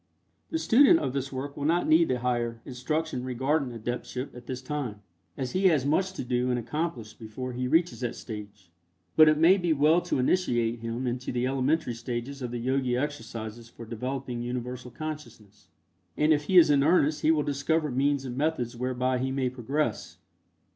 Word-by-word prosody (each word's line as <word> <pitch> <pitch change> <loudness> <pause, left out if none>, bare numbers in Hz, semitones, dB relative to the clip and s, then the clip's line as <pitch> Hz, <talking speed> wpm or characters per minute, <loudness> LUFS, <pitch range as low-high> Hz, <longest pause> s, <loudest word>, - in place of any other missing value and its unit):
The 320 - -1
student 290 +3 +6
of 130 - -2
this 135 -1 -3
work 140 +2 -5
will 145 - -4
not 170 +3 +2
need 160 +1 +5
the 130 - 0
higher 120 -2 -1
instruction 135 +2 -3
regarding 130 +3 0
adeptship 125 +3 -5
at 125 -1 -11
this 130 -1 -4
time, 130 -6 -5 0.3
as 130 -2 -3
he 190 +1 0
has 150 -7 +3
much 185 +6 +1
to 190 - -5
do 125 0 0
and 125 - +1
accomplish 125 -2 -3
before 125 +3 -7
he 125 +1 -2
reaches 165 +5 +2
that 125 -1 -3
stage, 105 -5 -9 0.4
but 155 -1 +8
it 155 - +3
may 170 +5 +6
be 175 -3 +1
well 155 +4 +4
to - - -1
initiate 120 -6 +1
him 115 +3 -4
into 125 +1 -3
the 125 0 -1
elementary 135 +1 0
stages 120 +4 -5
of 125 - -3
the 120 - -4
Yogi 130 0 0
exercises 115 -5 -5
for 115 - -11
developing 125 +2 -4
Universal 125 +1 -5
Consciousness, 120 - -8 0.5
and 155 +1 +4
if 150 -1 0
he 185 - +3
is 160 -4 +8
in 140 -1 +4
earnest 155 -1 +3
he 155 - +2
will 155 -2 +3
discover 150 +2 0
means 140 +1 +1
and 125 -1 -5
methods 135 -5 -1
whereby 125 +1 -1
he 130 +1 -1
may 130 -1 -1
progress. 135 +5 -2
130 Hz, 190 wpm, -27 LUFS, 120-150 Hz, 0.5 s, but